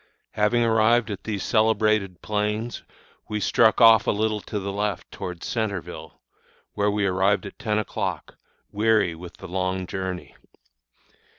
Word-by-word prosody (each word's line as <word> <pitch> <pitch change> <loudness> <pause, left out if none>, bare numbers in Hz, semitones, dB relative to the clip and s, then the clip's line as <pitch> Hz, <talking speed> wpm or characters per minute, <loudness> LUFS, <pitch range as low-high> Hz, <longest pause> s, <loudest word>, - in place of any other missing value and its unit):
Having 105 +3 +2
arrived 115 0 +3
at 100 - -7
these 105 -3 -3
celebrated 110 -4 +1
plains, 105 +2 -2 0.5
we 105 0 -2
struck 110 +2 +3
off 115 -2 +7
a - - +4
little 105 0 -1
to 105 - -5
the 100 0 -4
left 105 -1 -3
towards 90 -2 -6
Centreville, 105 -6 -4 0.5
where 105 0 +1
we 105 0 0
arrived 95 +2 +1
at 100 - -10
ten 105 -1 -1
o'clock, 110 - -3 0.4
weary 105 -4 +2
with 85 +2 -11
the 95 - -9
long 95 0 -2
journey. 95 -1 -5
105 Hz, 140 wpm, -24 LUFS, 95-110 Hz, 0.5 s, off